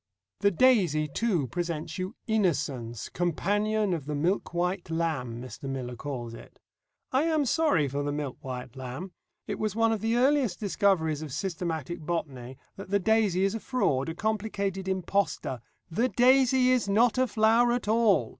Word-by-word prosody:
The 200 - +4
daisy, 185 - +3
too, 175 - 0
presents 165 +2 -4
you 185 +5 -4
Innocence, 140 - -1
"companion 205 +4 0
of 150 -5 -4
the 150 - -2
milk 175 +7 0
white 175 +1 -2
lamb," 155 -8 -2
Mr. 130 +2 -7
Miller 125 -2 -4
calls 120 -2 -5
it. - - -13 0.5
I 265 +4 +2
am 315 -3 +2
sorry 250 - +2
for 140 +2 -2
the 145 0 -2
milk 145 -3 -4
white 125 -1 -7
lamb. 130 +8 -6 0.3
It - - -4
was 215 -2 -1
one 225 0 +3
of 220 -3 -1
the 225 +1 +1
earliest 260 -5 +2
discoveries 190 -7 +1
of 155 -3 -6
systematic 170 -1 -3
botany 140 -6 -4 0.2
that 195 -1 -9
the 200 - +3
daisy 205 -2 +2
is 195 +1 +1
a 225 - -3
fraud, 165 - 0
a 165 - -5
complicated 200 -2 -2
impostor. 190 - -1 0.3
_The 235 +7 +1
daisy 255 0 +5
is 245 -5 +1
not 230 +5 +3
a 255 - +3
flower 230 +2 +3
at 240 -2 -1
all. 210 - +3
185 Hz, 165 wpm, -28 LUFS, 145-220 Hz, 0.5 s, daisy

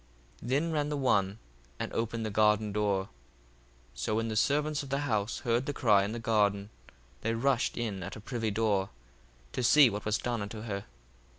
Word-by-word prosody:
1:25 120 - -7
Then 150 +6 +1
ran 150 -2 0
the 150 - -2
one, 100 -7 +1 0.4
and - - -4
opened 115 0 -2
the 110 - -3
garden 105 0 +3
door. 100 -2 +1
1:26 - - -15 0.8
So - - -2
when 115 +1 0
the 110 - -3
servants 150 +5 +1
of 140 - -8
the 140 +1 0
house 110 -6 -1
heard 120 +2 0
the 145 - -1
cry 105 -7 +4
in 100 - -2
the 115 - -4
garden, 105 -2 +1 0.5
they 115 +1 0
rushed 125 +1 +1
in 105 -5 -3
at 95 +3 -6
the - - -8
privy 115 0 -3
door, 100 -2 +1 0.6
to - - -3
see 130 +1 +6
what 105 +1 -4
was 105 0 +1
done 120 -3 -2
unto 105 +2 -6
her. 100 -3 -4
110 Hz, 200 wpm, -30 LUFS, 105-125 Hz, 0.8 s, see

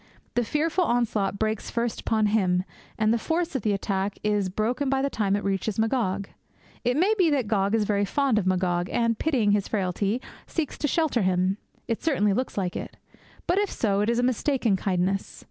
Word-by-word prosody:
The 240 - +1
fearful 310 - +1
onslaught 220 - 0
breaks 220 0 -1
first 235 -1 -2
upon 220 -1 +1
him; 185 -4 +2 0.3
and 215 +1 +3
the 235 - +1
force 335 +5 -1
of 265 - 0
the 210 - +1
attack 195 0 -1
is 210 -2 +1
broken 240 +8 -1
by 270 0 +1
the 280 - 0
time 200 -2 +1
it 205 - -2
reaches 195 +1 -1
Magog. 220 -4 0 0.6
It 245 +2 +1
may 380 +7 +4
be 350 -3 +5
that 275 -7 +1
Gog 200 0 +1
is 220 - +2
very 205 -1 +1
fond 255 +2 +1
of 190 - -2
Magog, 180 -1 +1
and, 230 -1 +1
pitying 250 -10 +2
his 205 -1 +1
frailty, 200 +2 -1 0.3
seeks 320 -4 -2
to 295 - +1
shelter 310 -6 +1
him. 185 +1 +1 0.3
It 230 - -2
certainly 210 -11 +2
looks 255 +2 -2
like 185 -3 -1
it. - - -6 0.5
But, 365 - +2
if 410 -1 +1
so, 200 -3 0
it 210 - +1
is 235 - +1
a 245 - +2
mistaken 250 -3 +1
kindness. 190 0 -1
215 Hz, 200 wpm, -26 LUFS, 195-255 Hz, 0.6 s, be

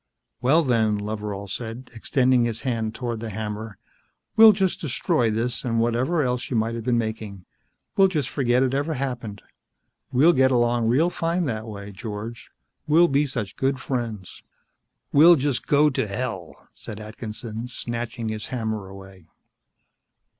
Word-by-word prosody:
"Well, 150 +7 +4
then," 110 -5 +2
Loveral 105 -1 -4
said, 115 +5 -6
extending 125 +1 +2
his 115 -1 -3
hand 115 -4 -2
toward 120 -3 -3
the 115 0 -5
hammer, 105 0 -5 0.6
"we'll 220 0 +10
just 190 -3 0
destroy 125 -5 +1
this 115 +3 -2
and 115 -2 0
whatever 125 +8 +1
else 125 -1 -2
you 125 - 0
might 110 +1 0
have 115 -1 -5
been 120 +1 +1
making. 110 -4 -4 0.5
We'll 195 -1 +6
just 155 -8 -1
forget 130 -2 +1
it 130 0 0
ever 145 +3 -1
happened. 125 -6 -4 0.7
We'll 150 +7 +5
get 130 -2 +4
along 120 -2 +2
real 150 +9 +3
fine 170 +1 -1
that 110 -4 -3
way, 100 -1 -8
George. 110 +2 -7 0.4
We'll 160 +3 +6
just - - -4
be 145 +1 +3
such 115 -7 -4
good 135 0 0
friends." 115 -8 -4 0.7
"We'll 165 +4 +8
just 140 -3 -1
go 150 0 +4
to 120 - -1
hell," 100 - -5
said 105 - -9
Atkinson, 110 +1 -7
snatching 120 -1 -4
his 110 0 -4
hammer 110 -5 -3
away. 95 -3 -13
120 Hz, 155 wpm, -24 LUFS, 110-135 Hz, 0.7 s, we'll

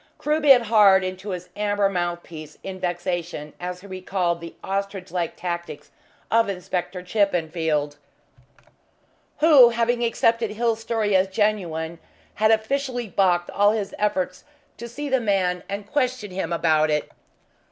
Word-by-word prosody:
Crewe 300 +1 0
bit 270 -5 +7
hard 205 -4 +5
into 185 +2 -5
his 180 -1 -5
amber 205 -1 +1
mouthpiece 175 -4 -4
in 190 -1 -6
vexation 175 -4 -3
as 180 0 -5
he - - -14
recalled 185 -2 -2
the 170 - -9
ostrich 195 -1 -4
like 175 -2 -2
tactics 175 -1 -6 0.4
of 230 -2 +3
Inspector 180 -1 -3
Chippenfield, 160 -6 0 1.4
who, 290 -7 +8
having 235 +1 0
accepted 230 -1 +1
Hill's 225 +1 -1
story 220 -3 0
as 190 +1 +4
genuine, 180 -5 -1 0.3
had 215 +1 +2
officially 245 +1 0
baulked 180 -3 +1
all 205 +1 +3
his 210 -3 -3
efforts 185 -3 -1 0.3
to 235 - -7
see 290 +5 -5
the 265 -2 +1
man 185 -4 0
and 200 +1 -4
question 255 -4 -1
him 180 -2 -3
about 155 -2 +2
it. 150 -1 -1
195 Hz, 140 wpm, -23 LUFS, 175-220 Hz, 1.4 s, who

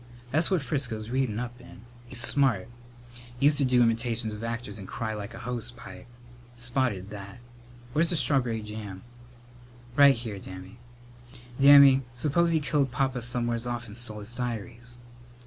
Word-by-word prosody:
"That's 160 +4 +2
what 185 -7 +1
Frisco's 120 -5 -3
readin' 130 -5 0
up 125 0 -6
in. 125 - -14 0.3
He's 120 - +1
smart. 120 -7 +2 0.7
Used 145 +2 +4
to 140 - +4
do 125 -1 +4
im'tations 115 -1 0
of 105 +1 -8
actors 115 -2 -5
and 95 - -9
cry 110 +2 -4
like 105 +1 -7
a - - -8
hose 120 -1 -4
pipe. 105 -6 -12 0.5
Spotted 120 -5 -1
that. 100 0 -9 0.6
Where's 160 +3 +2
the 175 - +1
strawb'ry 125 -6 +1
jam?" 105 -3 -8 0.9
"Right 140 -1 +7
here, 115 -4 -6
Dammy. 95 +4 -10 0.8
Dammy, 140 -1 +8
suppose 155 +6 +2
he 160 - +3
killed 145 -2 +1
Papa 130 0 -1
somewheres 120 0 0
off 120 0 -3
and 105 -2 -10
stole 110 -3 -4
his 110 +3 -9
diaries!" 120 0 -5
120 Hz, 155 wpm, -27 LUFS, 110-135 Hz, 0.9 s, Dammy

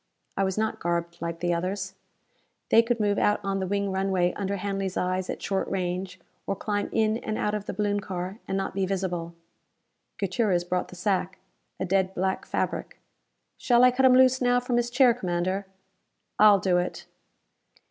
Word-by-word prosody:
I 195 - +1
was 190 0 -1
not 220 0 -1
garbed 170 0 -2
like 170 0 -4
the 175 0 +1
others. 185 +2 -3 0.8
They 225 - +8
could 230 0 -1
move 205 -1 +1
out 210 - +2
on 195 0 -1
the 190 - -2
wing 200 0 -1
runway 190 -2 +1
under 200 0 -2
Hanley's 195 -1 -3
eyes 185 0 -1
at - - -5
short 195 -1 -1
range, 185 0 -3 0.3
or 195 - 0
climb 205 +1 -2
in 220 0 +2
and 215 -2 -4
out 210 - -1
of 210 -1 -4
the - - -3
balloon 205 0 0
car, 190 +1 -5
and 195 - -1
not 195 - -2
be 195 -1 0
visible. 175 -3 -3 0.8
Gutierrez 195 -2 +1
brought 180 +1 -2
the - - -12
sack. 185 0 -1 0.4
A - - -1
dead 190 0 +1
black 190 +1 -1
fabric. - - -3 0.6
"Shall 240 -1 +4
I 250 - +7
cut 260 +1 +4
him 255 - +6
loose 260 0 +5
now 245 0 +3
from 245 -1 -1
his 240 0 +1
chair, 245 0 +5
Commander?" 185 -2 -2 0.7
"I'll 210 -1 +8
do 180 -1 +2
it." 180 - -4
195 Hz, 185 wpm, -26 LUFS, 180-210 Hz, 0.8 s, They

